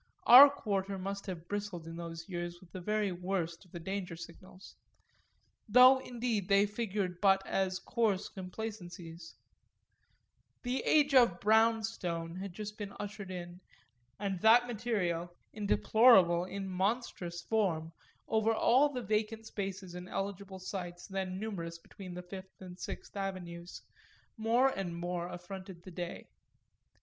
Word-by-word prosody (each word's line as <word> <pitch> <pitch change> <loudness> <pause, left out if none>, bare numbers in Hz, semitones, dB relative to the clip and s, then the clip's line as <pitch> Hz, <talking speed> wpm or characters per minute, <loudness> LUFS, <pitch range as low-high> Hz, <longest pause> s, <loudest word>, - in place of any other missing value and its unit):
Our 265 +4 +11
quarter 200 -7 -2
must 195 +2 -5
have 175 -3 -6
bristled 205 -4 -4
in 165 0 -7
those 165 -1 -7
years 175 -2 -5
with 180 -2 -18
the 185 - -7
very 210 +1 0
worst 180 -1 -3
of 180 - -23
the 170 - -7
danger 185 0 -4
signals 185 +3 -12 0.9
though 255 +4 +8
indeed 235 -6 -2
they 200 +1 +5
figured 205 -4 -3
but 195 -1 +4
as 190 -1 0
coarse 215 -5 0
complacencies; 180 -4 -8 1.3
the 250 +1 -1
age 290 -2 +4
of 235 -10 +5
"brown 220 +1 +4
stone" 170 -6 -4
had 195 0 -5
just 210 +3 -7
been 205 -1 -6
ushered 205 -1 -6
in, 175 0 -7 0.6
and 195 -2 -2
that 235 +2 +7
material, 200 -8 -2 0.2
in 210 -2 -4
deplorable, 195 -8 +5
in 195 +1 -5
monstrous 185 -3 -2
form, 170 -8 0 0.4
over 220 0 +2
all 265 +6 +4
the 250 -3 -4
vacant 220 +2 -1
spaces 195 -3 -5
and 180 +1 -8
eligible 195 0 -4
sites 180 -2 -6
then 190 -1 -4
numerous 175 -6 -5
between 180 +1 -10
the 180 - -6
Fifth 190 +1 -10
and 185 -1 -10
Sixth - - -7
Avenues, 180 -3 -6 0.5
more 235 +4 +3
and 190 -8 -4
more 175 0 -3
affronted 180 0 -9
the 185 - -10
day. 175 0 -6
195 Hz, 140 wpm, -32 LUFS, 175-215 Hz, 1.3 s, Our